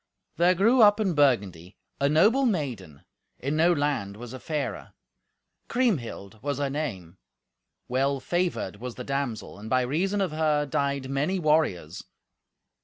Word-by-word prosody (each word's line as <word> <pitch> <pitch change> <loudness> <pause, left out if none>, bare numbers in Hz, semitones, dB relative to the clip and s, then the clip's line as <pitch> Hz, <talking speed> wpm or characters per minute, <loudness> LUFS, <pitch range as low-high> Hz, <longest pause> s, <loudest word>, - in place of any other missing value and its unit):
There 175 +2 +4
grew 230 +7 +4
up 205 0 +6
in 195 -5 +1
Burgundy 100 - +1 0.2
a 140 - +2
noble 215 - +4
maiden, 120 - -3 0.3
in 140 +4 -2
no 165 +3 +4
land 145 - -1
was 120 +1 -9
a 130 - -7
fairer. 150 -1 -4 0.7
Kriemhild 125 - -2
was 145 -1 -2
her 140 -1 -1
name. 95 - -5 0.7
Well 135 +2 0
favoured 175 - -2
was 125 +2 -7
the 125 - -6
damsel, 135 -7 -4
and 110 +2 -8
by 130 +1 +3
reason 175 +11 0
of 190 -4 0
her 155 -1 +1
died 140 -2 -1
many 145 +8 0
warriors. 150 - 0
140 Hz, 145 wpm, -26 LUFS, 120-170 Hz, 0.7 s, up